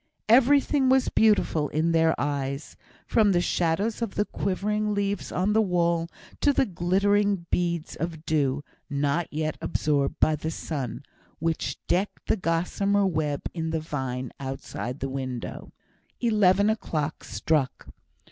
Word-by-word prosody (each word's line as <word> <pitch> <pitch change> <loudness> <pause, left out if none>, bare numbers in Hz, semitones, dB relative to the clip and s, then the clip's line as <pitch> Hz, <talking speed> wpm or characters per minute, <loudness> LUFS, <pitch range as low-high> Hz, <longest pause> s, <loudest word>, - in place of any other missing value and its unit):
Everything 270 +3 +4
was 260 0 +4
beautiful 200 -9 +3
in 160 +3 +1
their 165 -1 +3
eyes; 140 0 -3 0.3
from 210 -3 +3
the 175 - +3
shadows 180 +6 0
of 230 -4 -3
the 205 - +1
quivering 210 +2 -1
leaves 200 0 -2
on 190 +4 +1
the 220 - +4
wall 170 -3 +1 0.3
to 290 - +4
the 270 - +2
glittering 200 +1 +1
beads 170 -2 -1
of 165 -1 -4
dew, 145 -3 +1 0.3
not 145 +3 0
yet 155 0 -2
absorbed 140 -2 0
by 155 - +4
the 155 +1 -4
sun, 145 -6 -4 0.3
which 165 0 -2
decked 190 +3 -1
the - - +3
gossamer 195 +3 +1
web 155 -5 -1
in 160 -2 -3
the 160 0 -1
vine 130 -5 -4
outside 135 -1 -5
the 135 - -1
window. 130 -2 -5 0.5
Eleven 205 -4 +4
o'clock 155 -8 -3
struck. 150 -5 -1
170 Hz, 140 wpm, -26 LUFS, 150-205 Hz, 0.5 s, Everything